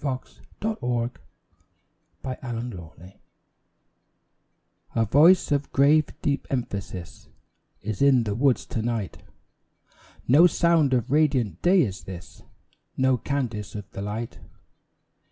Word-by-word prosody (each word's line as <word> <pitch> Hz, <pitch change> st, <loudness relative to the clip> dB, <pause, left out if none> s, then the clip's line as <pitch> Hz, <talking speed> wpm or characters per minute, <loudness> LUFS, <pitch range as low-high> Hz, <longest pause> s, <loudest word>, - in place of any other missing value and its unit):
In -, -, -1 dB
Memory 130 Hz, -1 st, -2 dB, 0.4 s
of 220 Hz, 0 st, -1 dB
Edward 120 Hz, 0 st, -2 dB, 1.0 s
Butler 115 Hz, -9 st, -7 dB, 1.8 s
A 115 Hz, -1 st, +2 dB
voice 155 Hz, -, +5 dB
of 145 Hz, -1 st, 0 dB
grave, 150 Hz, +3 st, +4 dB
deep 140 Hz, -1 st, -1 dB
emphasis 100 Hz, -8 st, -5 dB, 0.5 s
Is 110 Hz, -2 st, -4 dB
in 135 Hz, -3 st, +5 dB
the 105 Hz, -2 st, -2 dB
woods 130 Hz, +3 st, +2 dB
to 115 Hz, -, -3 dB
night; 115 Hz, -4 st, -3 dB, 1.1 s
No 150 Hz, +8 st, +7 dB
sound 165 Hz, -6 st, +3 dB
of 125 Hz, +1 st, -1 dB
radiant 135 Hz, -, +1 dB
day 180 Hz, -1 st, +5 dB
is 95 Hz, -6 st, -5 dB
this, 90 Hz, -1 st, -10 dB, 0.6 s
No 130 Hz, 0 st, +3 dB
cadence 120 Hz, -8 st, -3 dB
of 100 Hz, -2 st, -8 dB
the 95 Hz, -, -7 dB
light. 105 Hz, +3 st, -5 dB
125 Hz, 115 wpm, -25 LUFS, 105-140 Hz, 1.8 s, No